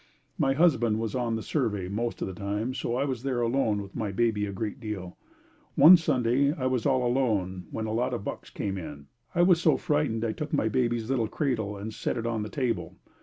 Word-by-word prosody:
My 135 - +3
husband 130 -8 +3
was 110 -2 -3
on 120 -3 -1
the 110 - -4
survey 105 - -1
most 115 +5 -3
of - - -2
the 95 - -5
time 105 +6 -3
so 120 -2 -2
I 135 +3 +1
was 130 -4 -3
there 130 -2 -1
alone 115 -4 +1
with 100 - -13
my 105 -3 -2
baby 105 0 +1
a - - -4
great 105 +5 -4
deal. 105 -6 -6 0.6
One 175 +4 +10
Sunday 135 -4 +2
I 135 -5 -4
was 130 0 +1
all 130 -2 +2
alone 105 -8 0
when 110 - -4
a 110 - -3
lot 120 +3 0
of 115 - -5
bucks - - -6
come 95 -1 -3
in 75 -4 -8 0.3
I 175 - +4
was 175 -2 +5
so - - +4
frightened 145 -9 0
I 110 - 0
took 150 +6 -6
my 110 - +2
baby's 120 -1 0
little 120 -4 +1
cradle 110 -7 -2
and 105 +2 -6
set - - -2
it 115 - -3
on 115 -2 -1
the 105 - -4
table. 125 -3 -2
115 Hz, 225 wpm, -27 LUFS, 105-130 Hz, 0.6 s, One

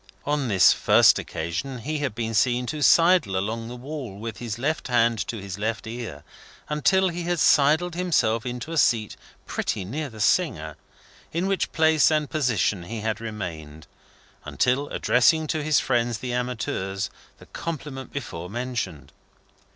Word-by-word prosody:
On 145 -2 0
this 95 -5 +6
first - - +5
occasion 85 +12 -4
he 150 +6 -3
had 140 -7 -2
been 115 -1 -3
seen 125 +3 +2
to 150 +4 -4
sidle 165 - +5
along 110 +4 -3
the 120 - -7
wall, 130 -5 -7
with 110 +1 -6
his 115 -3 -5
left 145 +5 -2
hand 120 -2 +2
to 115 - -4
his 100 0 -7
left 110 +1 -2
ear, 110 -11 -7 0.5
until 190 +6 +2
he 175 0 -4
had 175 0 -1
sidled 155 +5 +4
himself 140 -11 +1
into 125 +4 -5
a 165 - +1
seat 115 -4 +2 0.3
pretty 95 - -2
near 145 +9 -4
the 110 -2 -12
singer, 95 - +1 0.6
in 170 +3 -1
which 195 -2 0
place 160 -1 +4
and 155 -2 0
position 120 - 0
he 110 +3 -5
had 110 0 -2
remained, 80 -9 -7 0.6
until 130 +3 0
addressing 155 +6 +3
to 155 +1 -1
his 150 0 +3
friends 120 -2 0
the 125 +1 -4
amateurs 105 -6 -3 0.3
the - - -15
compliment 150 -5 -6
before 90 -11 -6
mentioned. 115 - -4
125 Hz, 160 wpm, -25 LUFS, 110-150 Hz, 0.6 s, this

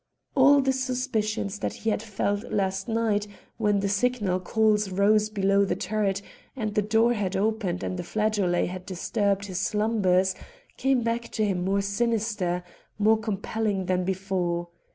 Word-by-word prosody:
All 280 +1 +6
the 265 0 +1
suspicions 235 -6 -2
that - - -2
he 225 - -2
had 210 - -1
felt 205 0 -2
last 195 -1 -1
night, 220 -2 0 0.3
when 210 -3 +2
the 200 - 0
signal 200 -2 +1
calls 210 +1 +2
rose 210 +3 +3
below 200 -1 +2
the 195 - 0
turret 200 -2 -1 0.3
and 215 -5 -3
the 210 - +2
door 225 +3 +3
had 200 -4 -2
opened 200 -3 -1
and 185 - -3
the - - -3
flageolet 205 -3 +1
had 185 +1 -7
disturbed 200 +2 -1
his 185 -2 -4
slumbers, 195 -3 +2 0.4
came 265 -2 +1
back 230 +1 -2
to 215 - +1
him 185 -3 -1
more 195 +2 +1
sinister, 200 -3 -1 0.3
more 215 +1 +4
compelling 210 -1 -2
than 185 0 +1
before. 180 -2 -2
205 Hz, 155 wpm, -26 LUFS, 190-220 Hz, 0.4 s, All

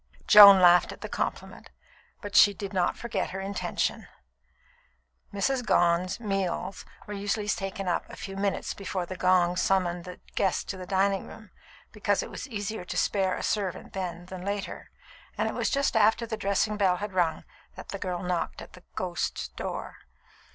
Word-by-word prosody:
Joan 200 -2 +10
laughed 175 -1 +6
at - - -11
the - - -5
compliment, - - -4 0.5
but 205 -1 -7
she 205 -1 +7
did 200 0 -6
not 180 -2 +1
forget 235 - -3
her 190 - -5
intention. 195 0 -2 1.2
Mrs. 250 +6 0
Gone's 175 -1 +2
meals 195 -3 -3 0.2
were 210 - -7
usually 205 +1 -2
taken 195 -2 -3
up 175 - -1
a - - -9
few 195 - -7
minutes 195 0 -2
before 190 -2 -4
the 185 - -7
gong 180 -1 +3
summoned 180 -1 0
the 180 0 -9 0.2
guests 190 -2 +1
to 195 - -6
the 185 -1 -8
dining 195 0 +1
room, 220 -2 -13 0.4
because - - 0
it - - -9
was - - -7
easier 215 -4 -4
to - - -5
spare 190 -2 +1
a - - -5
servant 195 -4 -2
then 175 -2 -5
than 185 0 -8
later, 200 0 -4 0.5
and - - 0
it - - -3
was - - -1
just 280 -3 0
after 225 +2 +3
the 225 -1 -4
dressing 210 +1 0
bell 190 -3 +3
had 205 +2 -5
rung 170 -4 0 0.3
that - - -10
the 200 - -5
girl 180 -2 -3
knocked 180 -1 -2
at - - -11
the 180 - -14
"ghost's" 175 - -3
door. 60 - -6
195 Hz, 180 wpm, -27 LUFS, 180-205 Hz, 1.2 s, Joan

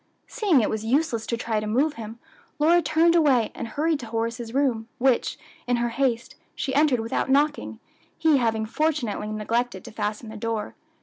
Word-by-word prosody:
Seeing 400 - +2
it 215 - 0
was 220 -1 -3
useless 240 -1 0
to 235 - -1
try 225 -2 -1
to 210 - -4
move 275 +8 +1
him, 225 -3 -8 0.4
Lora 330 +3 +4
turned 335 +1 +3
away 275 -9 +3
and 235 - -5
hurried 305 +6 0
to 235 - -8
Horace's 230 +1 -3
room, 250 -4 0
which, 260 -1 +1 0.3
in 245 - +2
her 240 0 0
haste, 235 -1 -1 0.2
she 270 - -3
entered 285 -3 +3
without 225 +3 -2
knocking, 290 +2 +1 0.4
he 315 -3 +4
having 225 -3 0
fortunately 245 -5 -1
neglected 230 +4 -2
to 235 - -9
fasten 215 +1 -4
the 220 - -8
door. 225 -1 -3
240 Hz, 180 wpm, -25 LUFS, 225-290 Hz, 0.4 s, Lora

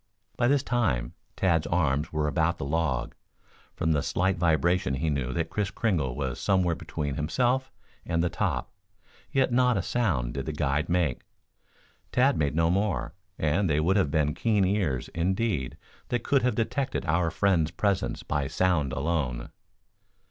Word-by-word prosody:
By 120 - +2
this 140 +1 +3
time, 95 - 0 0.2
Tad's 85 -4 +1
arms 75 -3 +1
were 75 -1 0
about 80 +2 +1
the - - -4
log. 70 -5 -1 0.6
From 80 - 0
the 75 -2 +2
slight 95 +5 0
vibration 85 -3 +2
he 80 +3 -1
knew 65 -3 -1
that 80 +2 -2
Kris 105 -2 -1
Kringle 85 - -1
was 65 -3 -3
somewhere 95 -3 +2
between 75 -3 -4
himself 125 - 0 0.3
and 85 0 0
the - - +2
top, - - -2 0.6
yet 135 -2 +2
not 125 -2 +3
a 95 - -1
sound 80 - 0
did 70 +1 -4
the 80 - -2
guide 75 +1 0
make. 85 -7 +1 0.9
Tad 135 +2 +3
made 75 -1 0
no 80 +1 +3
more, 95 -4 0 0.2
and 80 +5 +1
they 75 0 +2
would 90 +5 +2
have 95 -8 +2
been 75 0 +1
keen 105 -1 +2
ears, 90 -10 0
indeed, 90 - -1 0.3
that 120 -2 -1
could 140 -2 +2
have 125 - +1
detected 130 +4 -1
our 85 +1 +2
friends' 85 -3 +2
presence 95 +3 -1
by 70 -2 -1
sound 80 -6 +1
alone. 70 -5 -2
85 Hz, 165 wpm, -27 LUFS, 75-100 Hz, 0.9 s, this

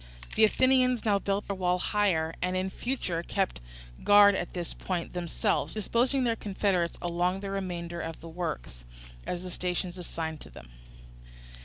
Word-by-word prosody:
The 220 - +4
Athenians 255 +1 +4
now 205 -2 +3
built 200 +1 -1
their 200 - -2
wall 180 -1 +1
higher, 180 -5 +1
and 180 0 0
in 190 +1 -1
future 190 -10 -2
kept 190 - -1 0.4
guard 205 0 +8
at 175 -2 -3
this 175 -2 -3
point 175 -3 -3
themselves, 180 +6 -1
disposing 245 +5 +1
their 235 -2 +2
confederates 190 -5 0
along 175 +2 0
the 200 -1 -4
remainder 175 -3 -3
of 165 0 -5
the 165 - -10
works, 160 - -5 0.4
at 180 0 -3
the 180 - -6
stations 180 0 -2
assigned 160 -2 -4
to - - -10
them. - - -13
185 Hz, 160 wpm, -29 LUFS, 170-205 Hz, 0.4 s, guard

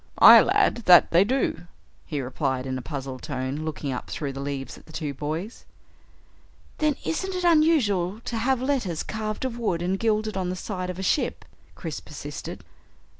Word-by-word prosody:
"Aye - - +10
lad, - - +2
that 175 -2 +7
they 170 +3 +6
do," 245 -5 -1 0.4
Ned 145 -3 -2
replied 130 0 -2
in 130 -1 -3
a 130 - -4
puzzled 135 -2 -6
tone, 130 -1 -3
looking 155 -2 -4
up 125 - -5
through 140 -3 -4
the 135 - -7
leaves 140 -2 -4
at - - -17
the - - -13
two 150 -2 -4
boys. 155 - -5 1.2
"Then 305 -2 +2
isn't 380 +3 -2
it 360 - -2
unusual 265 - +3
to 235 - -4
have 255 +2 +1
letters 245 - -1
carved 215 +2 -4
of 240 -2 -4
wood 175 -7 -1
and 190 +2 -1
gilded, 215 -1 0
on 185 -2 -1
the 180 - -2
side 185 -1 -4
of 180 - -5
a 190 - -4
ship?" 240 - 0 0.3
Chris - - -5
persisted. - - -8
180 Hz, 180 wpm, -25 LUFS, 145-230 Hz, 1.2 s, Aye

